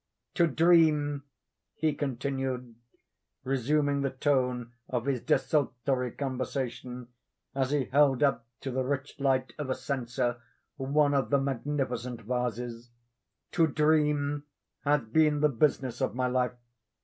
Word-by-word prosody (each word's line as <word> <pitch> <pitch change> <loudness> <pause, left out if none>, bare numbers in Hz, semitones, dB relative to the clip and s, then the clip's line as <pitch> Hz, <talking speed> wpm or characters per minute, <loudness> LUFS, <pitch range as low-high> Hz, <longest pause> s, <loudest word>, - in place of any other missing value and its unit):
"To 170 -3 +4
dream," 155 -3 +3 0.5
he 155 -1 +1
continued, 135 -2 -3 0.7
resuming 140 +2 +1
the 135 - +1
tone 125 -3 0 0.2
of 125 -1 -1
his 135 -4 0
desultory 130 -3 +1
conversation, 125 -2 -4 0.4
as 135 -1 0
he 145 -2 +1
held 140 0 +3
up 130 -5 +1
to 135 - -4
the 130 +1 0
rich 140 +1 -3
light 130 -2 +1
of 145 -3 -3
a 130 - +1
censer 120 -2 -2 0.4
one 145 +2 +2
of 140 -2 +1
the 140 - +4
magnificent 130 -3 -2
vases—"to 120 - -3
dream 150 -1 +2 0.4
has 145 0 +3
been 150 +6 +2
the 150 - +5
business 130 -1 0
of - - 0
my 130 0 0
life. 125 0 +1
135 Hz, 125 wpm, -29 LUFS, 125-145 Hz, 0.7 s, the